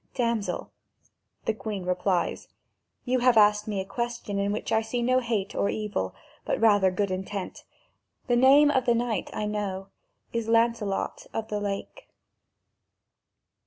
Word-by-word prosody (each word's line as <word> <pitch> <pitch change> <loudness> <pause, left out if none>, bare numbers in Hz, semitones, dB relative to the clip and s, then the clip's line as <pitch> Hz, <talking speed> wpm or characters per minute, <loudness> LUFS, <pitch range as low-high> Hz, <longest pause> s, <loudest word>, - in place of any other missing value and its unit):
"Damsel," 235 -4 -1 0.7
the 220 - +1
Queen 210 -4 -5
replies, 180 -1 0 0.6
"you 255 0 +1
have 245 -1 +4
asked 210 0 +5
me 205 -2 -2
a 190 - -3
question 225 -1 -3
in 200 0 0
which 210 - -3
I 220 - +3
see 240 +2 -2
no 255 +1 +3
hate 225 -5 -2
or 200 - 0
evil, 200 - -3 0.3
but - - -1
rather 205 -4 +5
good 190 +1 -1
intent; 190 +1 -5 0.6
the 245 - +2
name 275 +4 +6
of 260 -3 +1
the 240 - +4
knight, 235 -2 -1
I 210 - -3
know, 200 -2 -3 0.4
is 230 -1 -2
Lancelot 230 -3 0
of 220 -1 -3
the 210 - -1
Lake." 205 - -5
215 Hz, 150 wpm, -27 LUFS, 200-235 Hz, 0.7 s, name